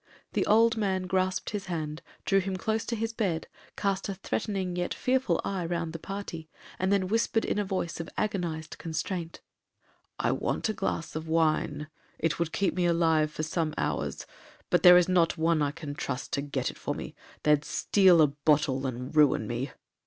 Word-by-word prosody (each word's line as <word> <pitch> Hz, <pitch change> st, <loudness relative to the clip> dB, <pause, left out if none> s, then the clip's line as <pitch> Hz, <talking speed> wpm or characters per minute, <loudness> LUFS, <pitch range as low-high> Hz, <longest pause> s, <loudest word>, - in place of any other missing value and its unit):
The -, -, +1 dB
old 225 Hz, +2 st, +5 dB
man 190 Hz, -3 st, 0 dB
grasped 185 Hz, 0 st, 0 dB
his 200 Hz, -3 st, -4 dB
hand, 155 Hz, -3 st, -3 dB, 0.2 s
drew 195 Hz, -, +4 dB
him 190 Hz, 0 st, -2 dB
close 220 Hz, +4 st, -1 dB
to 235 Hz, -, -2 dB
his 225 Hz, +1 st, -2 dB
bed, 185 Hz, -8 st, -1 dB, 0.3 s
cast 195 Hz, -1 st, -1 dB
a 195 Hz, -, -3 dB
threatening 195 Hz, -1 st, -2 dB
yet 175 Hz, 0 st, -2 dB
fearful 255 Hz, -9 st, +1 dB
eye 190 Hz, -2 st, -2 dB
round 165 Hz, -1 st, -2 dB
the 165 Hz, -, -5 dB
party, 170 Hz, -4 st, -6 dB, 0.3 s
and 185 Hz, +1 st, +1 dB
then 195 Hz, -2 st, +2 dB
whispered 225 Hz, +2 st, +1 dB
in -, -, 0 dB
a -, -, +1 dB
voice 185 Hz, -4 st, -3 dB
of 165 Hz, -, -5 dB
agonized 170 Hz, -7 st, -2 dB
constraint, 165 Hz, +1 st, -4 dB, 0.8 s
'I -, -, +1 dB
want -, -, -1 dB
a -, -, 0 dB
glass 165 Hz, -6 st, -3 dB
of 155 Hz, +1 st, -4 dB
wine, 155 Hz, -2 st, +1 dB, 0.3 s
it 165 Hz, 0 st, -1 dB
would 170 Hz, -1 st, 0 dB
keep 195 Hz, +2 st, +1 dB
me 180 Hz, -1 st, +1 dB
alive 165 Hz, -2 st, +3 dB
for 155 Hz, +1 st, -5 dB
some 160 Hz, -1 st, -1 dB
hours, -, -, -2 dB, 0.5 s
but -, -, +4 dB
there 180 Hz, 0 st, +9 dB
is 180 Hz, -, +4 dB
not 175 Hz, -2 st, +3 dB
one 165 Hz, -1 st, +2 dB
I 145 Hz, -, +2 dB
can 150 Hz, -1 st, -6 dB
trust 135 Hz, -2 st, -4 dB
to 140 Hz, -, +1 dB
get 140 Hz, -3 st, -2 dB
it -, -, -17 dB
for -, -, -3 dB
me,—they'd 150 Hz, -1 st, -1 dB
steal 180 Hz, -1 st, +4 dB
a -, -, +5 dB
bottle, 145 Hz, -2 st, +1 dB
and 125 Hz, +3 st, -5 dB
ruin 145 Hz, -7 st, +4 dB
me.' 120 Hz, +5 st, -3 dB
170 Hz, 190 wpm, -28 LUFS, 155-195 Hz, 0.8 s, there